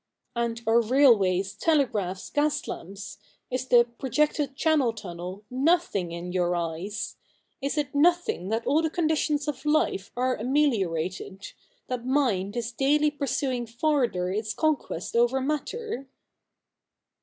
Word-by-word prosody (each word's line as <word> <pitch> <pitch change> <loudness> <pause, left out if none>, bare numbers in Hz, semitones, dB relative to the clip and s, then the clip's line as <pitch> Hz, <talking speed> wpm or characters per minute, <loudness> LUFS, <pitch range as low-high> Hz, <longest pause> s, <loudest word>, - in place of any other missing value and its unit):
'And 235 0 -2
are 225 +1 +4
railways, 210 -7 +4
telegraphs, 210 - 0
gas 295 0 0
lamps 195 +3 -7 0.2
— - - -45
is 255 +1 -2
the 240 -1 +7 0.2
projected 285 +1 0
Channel 295 -6 +2
tunnel, 185 -1 -7
nothing 260 - +1
in 170 +1 -5
your 180 -1 +1
eyes? 175 +5 -4 0.4
Is 275 +3 -2
it 290 -2 -1
nothing 325 - +2
that 225 +1 -1
all 295 +4 +3
the 320 - 0
conditions 310 -3 0
of 275 -3 -3
life 300 -10 +1
are 255 +1 +1
ameliorated, 195 - -1 0.3
that 250 -2 -4
mind 245 -6 +1
is 235 0 -2
daily 295 +5 +2
pursuing 270 -4 -2
farther 240 - 0
its 215 +2 -2
conquest 295 - -1
over 240 +3 +3
matter 300 - -3
245 Hz, 130 wpm, -27 LUFS, 200-290 Hz, 0.4 s, the